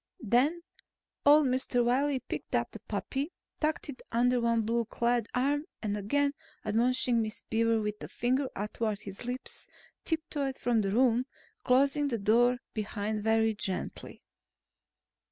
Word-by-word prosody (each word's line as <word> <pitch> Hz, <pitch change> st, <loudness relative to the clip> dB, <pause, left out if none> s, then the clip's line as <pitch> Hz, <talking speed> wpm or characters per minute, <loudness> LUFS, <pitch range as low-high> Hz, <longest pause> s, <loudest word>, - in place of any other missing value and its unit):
Then 270 Hz, -, +2 dB, 0.6 s
old 295 Hz, +1 st, +8 dB
Mr. 255 Hz, -1 st, +1 dB
Wiley 265 Hz, +2 st, +2 dB
picked -, -, -4 dB
up -, -, 0 dB
the -, -, -8 dB
puppy, 280 Hz, +5 st, -3 dB, 0.3 s
tucked 310 Hz, +1 st, 0 dB
it 280 Hz, -3 st, -8 dB
under 245 Hz, +1 st, +3 dB
one 230 Hz, -1 st, +2 dB
blue 230 Hz, +2 st, 0 dB
clad 235 Hz, 0 st, 0 dB
arm 285 Hz, +4 st, +1 dB, 0.2 s
and 205 Hz, -1 st, -1 dB
again 280 Hz, +8 st, +1 dB, 0.3 s
admonishing 235 Hz, +2 st, +2 dB
Miss 215 Hz, -1 st, -4 dB
Beaver 230 Hz, 0 st, +3 dB
with 210 Hz, -1 st, -3 dB
a -, -, -5 dB
finger 255 Hz, +3 st, 0 dB
athwart 210 Hz, +1 st, -2 dB
his 195 Hz, +3 st, -8 dB
lips, 250 Hz, +2 st, -5 dB, 0.4 s
tiptoed 295 Hz, -4 st, -2 dB
from 235 Hz, -2 st, +1 dB
the 195 Hz, -, -1 dB
room, 245 Hz, +2 st, +3 dB, 0.4 s
closing 275 Hz, +3 st, +3 dB
the 240 Hz, -4 st, -1 dB
door 235 Hz, +4 st, +3 dB, 0.2 s
behind 210 Hz, -1 st, -3 dB
very 220 Hz, 0 st, +3 dB
gently. 195 Hz, -2 st, -5 dB
240 Hz, 140 wpm, -30 LUFS, 220-270 Hz, 0.6 s, old